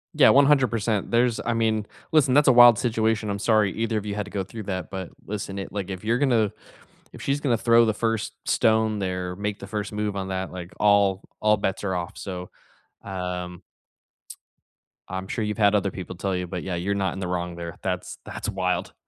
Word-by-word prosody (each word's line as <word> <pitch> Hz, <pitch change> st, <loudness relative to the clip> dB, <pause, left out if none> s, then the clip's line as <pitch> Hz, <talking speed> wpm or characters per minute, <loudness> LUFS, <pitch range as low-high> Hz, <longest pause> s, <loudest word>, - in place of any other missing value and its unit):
Yeah, -, -, +7 dB
100%. 125 Hz, -7 st, +3 dB
There's 120 Hz, 0 st, +2 dB
I 120 Hz, -, 0 dB
mean, 110 Hz, -2 st, 0 dB, 0.2 s
listen, 140 Hz, -4 st, +4 dB
that's 145 Hz, 0 st, +5 dB
a -, -, +8 dB
wild 120 Hz, -2 st, +8 dB
situation, 110 Hz, -2 st, 0 dB
I'm 100 Hz, 0 st, -2 dB
sorry 110 Hz, -3 st, +3 dB
either 115 Hz, 0 st, -1 dB
of 105 Hz, -, -3 dB
you 105 Hz, -, -3 dB
had 105 Hz, 0 st, -3 dB
to 105 Hz, -, -12 dB
go 100 Hz, -, -2 dB
through 110 Hz, +3 st, -8 dB
that, 95 Hz, -2 st, -4 dB
but 95 Hz, -2 st, -5 dB, 0.2 s
listen, 100 Hz, -1 st, -5 dB
it 95 Hz, -, -5 dB
like, 100 Hz, -2 st, -4 dB
if 95 Hz, +1 st, -6 dB
you're 115 Hz, +3 st, +1 dB
gonna 120 Hz, -7 st, +2 dB, 0.6 s
if -, -, -10 dB
she's 140 Hz, +1 st, 0 dB
gonna 135 Hz, -5 st, +1 dB
throw 115 Hz, +1 st, +5 dB
the 110 Hz, -, +1 dB
first 115 Hz, 0 st, -1 dB
stone 110 Hz, -1 st, +2 dB
there, 90 Hz, -1 st, -3 dB
make 105 Hz, 0 st, -3 dB
the 100 Hz, -, -8 dB
first 105 Hz, 0 st, -4 dB
move 105 Hz, -1 st, -2 dB
on 95 Hz, -, -3 dB
that, 95 Hz, 0 st, -3 dB
like, 90 Hz, -1 st, -8 dB
all 100 Hz, -2 st, +4 dB, 0.2 s
all 105 Hz, 0 st, +4 dB
bets 95 Hz, -1 st, -2 dB
are 95 Hz, -2 st, -1 dB
off, 85 Hz, -1 st, -4 dB
so, 90 Hz, -2 st, -6 dB, 0.5 s
um 90 Hz, -2 st, -5 dB, 1.5 s
I'm 95 Hz, 0 st, -5 dB
sure 110 Hz, -, -2 dB
you've 105 Hz, +1 st, -2 dB
had 105 Hz, -1 st, +4 dB
other 100 Hz, -1 st, +1 dB
people 95 Hz, -1 st, -7 dB
tell 95 Hz, +1 st, -2 dB
you, 90 Hz, 0 st, -3 dB
but, 90 Hz, -1 st, -5 dB
yeah, 95 Hz, -2 st, -3 dB
you're 95 Hz, +4 st, -1 dB
not 95 Hz, -1 st, 0 dB
in -, -, -6 dB
the 95 Hz, -, -3 dB
wrong 90 Hz, -1 st, -3 dB
there. 85 Hz, -1 st, -7 dB
That's -, -, -3 dB
that's -, -, -6 dB
wild. 90 Hz, -3 st, -1 dB
100 Hz, 215 wpm, -25 LUFS, 95-110 Hz, 1.5 s, a